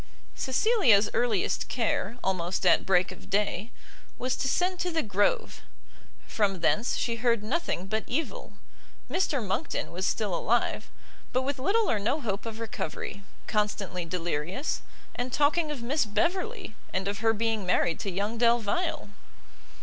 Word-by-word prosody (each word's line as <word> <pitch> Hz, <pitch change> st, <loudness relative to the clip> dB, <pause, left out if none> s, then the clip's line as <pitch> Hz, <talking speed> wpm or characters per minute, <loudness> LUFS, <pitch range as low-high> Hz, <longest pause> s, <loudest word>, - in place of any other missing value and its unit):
Cecilia's 260 Hz, -, +4 dB
earliest 235 Hz, -5 st, +1 dB
care, 230 Hz, -2 st, -1 dB
almost 185 Hz, -1 st, -1 dB
at -, -, +5 dB
break 185 Hz, -1 st, +3 dB
of 185 Hz, -, -12 dB
day, 205 Hz, +2 st, 0 dB, 0.5 s
was 255 Hz, +1 st, -1 dB
to -, -, -1 dB
send 360 Hz, +6 st, +1 dB
to 360 Hz, -, 0 dB
the 325 Hz, -2 st, 0 dB
Grove; 205 Hz, -1 st, +1 dB, 0.6 s
from 195 Hz, -5 st, 0 dB
thence 215 Hz, +7 st, +2 dB
she 235 Hz, -1 st, -1 dB
heard 230 Hz, -2 st, +2 dB
nothing 220 Hz, -, -1 dB
but 220 Hz, +3 st, -2 dB
evil; 305 Hz, +7 st, -3 dB, 0.6 s
Mr 285 Hz, -, +1 dB
Monckton 195 Hz, -, -2 dB
was 185 Hz, +3 st, -1 dB
still 210 Hz, -4 st, 0 dB
alive, 235 Hz, +7 st, 0 dB, 0.4 s
but 255 Hz, -, +1 dB
with 275 Hz, 0 st, -2 dB
little 420 Hz, +11 st, +2 dB
or 215 Hz, -, +2 dB
no 235 Hz, +9 st, 0 dB
hope 215 Hz, -4 st, -3 dB
of 225 Hz, 0 st, -6 dB
recovery, 225 Hz, -2 st, -4 dB, 0.2 s
constantly 205 Hz, -4 st, -1 dB
delirious, 175 Hz, -, -2 dB, 0.3 s
and 245 Hz, +1 st, -3 dB
talking 300 Hz, +4 st, +2 dB
of 280 Hz, -6 st, -4 dB
Miss 275 Hz, +3 st, +1 dB
Beverley, 365 Hz, -, -1 dB, 0.2 s
and 190 Hz, 0 st, -1 dB
of 200 Hz, +1 st, -2 dB
her 225 Hz, 0 st, +3 dB
being 225 Hz, -1 st, 0 dB
married 175 Hz, -2 st, +1 dB
to 200 Hz, -, -3 dB
young 205 Hz, +5 st, -2 dB
Delvile. 235 Hz, -, +1 dB
225 Hz, 150 wpm, -28 LUFS, 200-270 Hz, 0.6 s, at